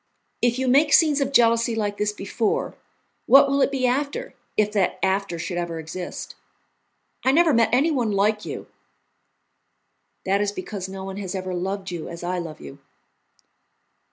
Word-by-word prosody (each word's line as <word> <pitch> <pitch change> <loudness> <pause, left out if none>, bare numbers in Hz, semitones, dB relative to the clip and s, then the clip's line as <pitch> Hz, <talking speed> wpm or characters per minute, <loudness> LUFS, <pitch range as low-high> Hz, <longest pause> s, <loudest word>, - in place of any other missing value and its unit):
If 240 0 +2
you 260 0 -1
make 285 +4 +4
scenes 300 -3 +5
of 275 0 0
jealousy 230 -2 +3
like 205 -2 -2
this 210 0 +1
before, 210 +2 -2 0.5
what 275 +1 +8
will 275 0 +1
it - - +4
be 270 -2 -1
after, 280 +3 -1 0.2
if 210 -1 +2
that 200 -4 0
after 190 -2 0
should 175 +2 -3
ever 170 -1 -4
exist? 165 +3 -6 0.9
I 260 - +4
never 325 +1 +4
met 230 -2 +4
anyone 260 -4 +2
like 210 +2 +1
you." - - -6 1.6
"That 195 +1 +2
is 205 -1 0
because 190 -1 -6
no 190 0 -7
one 195 0 -6
has 195 -2 -5
ever 185 -1 -4
loved 190 +2 -3
you 170 -3 -5
as 170 0 -8
I 180 +1 -2
love 165 -3 -7
you." 70 -1 -11
205 Hz, 165 wpm, -23 LUFS, 185-255 Hz, 1.6 s, what